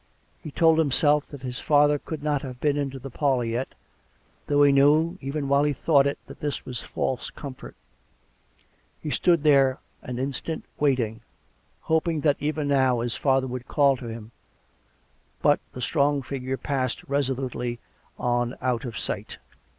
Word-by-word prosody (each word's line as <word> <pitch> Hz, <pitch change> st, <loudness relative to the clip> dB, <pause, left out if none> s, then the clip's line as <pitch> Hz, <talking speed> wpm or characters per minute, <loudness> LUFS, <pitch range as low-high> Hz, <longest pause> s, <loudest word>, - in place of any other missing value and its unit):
He -, -, -7 dB
told 160 Hz, +2 st, +4 dB
himself 150 Hz, 0 st, +3 dB
that 140 Hz, -3 st, -10 dB
his 125 Hz, -1 st, -4 dB
father 145 Hz, 0 st, +4 dB
could 155 Hz, 0 st, -7 dB
not 145 Hz, -2 st, 0 dB
have 130 Hz, -3 st, -8 dB
been 145 Hz, +1 st, +1 dB
into 140 Hz, -2 st, -2 dB
the 135 Hz, +1 st, -8 dB
parlour 135 Hz, -2 st, +1 dB
yet, 115 Hz, +3 st, -2 dB, 0.8 s
though 145 Hz, 0 st, +4 dB
he 140 Hz, -, +6 dB
knew, 155 Hz, +6 st, +4 dB
even 140 Hz, +1 st, -3 dB
while 140 Hz, +1 st, +3 dB
he 145 Hz, 0 st, +1 dB
thought 140 Hz, 0 st, +3 dB
it, 140 Hz, -, -2 dB
that -, -, -12 dB
this 145 Hz, -1 st, -3 dB
was 125 Hz, -3 st, -5 dB
false 130 Hz, -, -3 dB
com 140 Hz, -3 st, -8 dB
fort. -, -, -12 dB, 1.2 s
He 150 Hz, -, -5 dB
stood 170 Hz, -2 st, +2 dB
there 135 Hz, -3 st, +4 dB, 0.2 s
an 125 Hz, -1 st, -6 dB
instant, 140 Hz, +5 st, -4 dB
waiting; 120 Hz, -6 st, +1 dB, 0.6 s
hoping 160 Hz, -1 st, 0 dB
that 145 Hz, -2 st, +3 dB
even 150 Hz, 0 st, -1 dB
now 130 Hz, -4 st, +3 dB
his 120 Hz, -2 st, -2 dB
father 135 Hz, -1 st, +2 dB
would 125 Hz, -1 st, -6 dB
call 140 Hz, -2 st, +3 dB
to 120 Hz, -, -8 dB
him; 115 Hz, -1 st, -8 dB, 1.1 s
but -, -, +5 dB
the 125 Hz, -, -7 dB
strong 140 Hz, +1 st, +1 dB
figure 130 Hz, 0 st, -4 dB
passed 130 Hz, -3 st, -2 dB
resolutely 130 Hz, -3 st, -2 dB, 0.4 s
on 120 Hz, 0 st, 0 dB
out 125 Hz, -1 st, -1 dB
of 115 Hz, -3 st, -5 dB
sight. -, -, -4 dB
140 Hz, 165 wpm, -25 LUFS, 125-145 Hz, 1.2 s, he